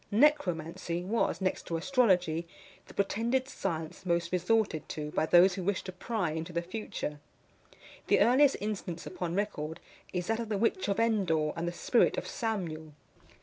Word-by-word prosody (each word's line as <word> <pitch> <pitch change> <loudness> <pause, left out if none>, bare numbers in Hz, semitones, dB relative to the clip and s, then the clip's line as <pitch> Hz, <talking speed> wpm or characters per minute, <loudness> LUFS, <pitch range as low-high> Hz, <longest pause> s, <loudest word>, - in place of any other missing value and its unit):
NECROMANCY 180 - +1
was, 210 +1 0
next 185 - -1
to 165 - -1
astrology, 180 - +2 0.4
the - - -13
pretended 235 +6 0
science 165 - -4
most 170 -1 0
resorted 180 -2 +1
to, 150 -1 -4
by 155 - 0
those 180 +3 +6
who 185 -1 -4
wished 200 +1 -1
to 185 - -5
pry 185 -2 -2
into 160 +2 -4
the 170 0 -1
future. 175 -6 -5 0.9
The - - +4
earliest 270 +3 +5
instance 195 -5 -4
upon 175 -2 -4
record 165 -6 -2 0.3
is 180 -1 -2
that 225 +3 0
of 230 -2 -4
the 210 - 0
witch 205 -2 +1
of 200 +1 0
Endor 185 -10 +2
and 170 +1 -2
the - - 0
spirit 175 - +2
of - - -2
Samuel. 175 - -3
185 Hz, 165 wpm, -30 LUFS, 165-220 Hz, 0.9 s, those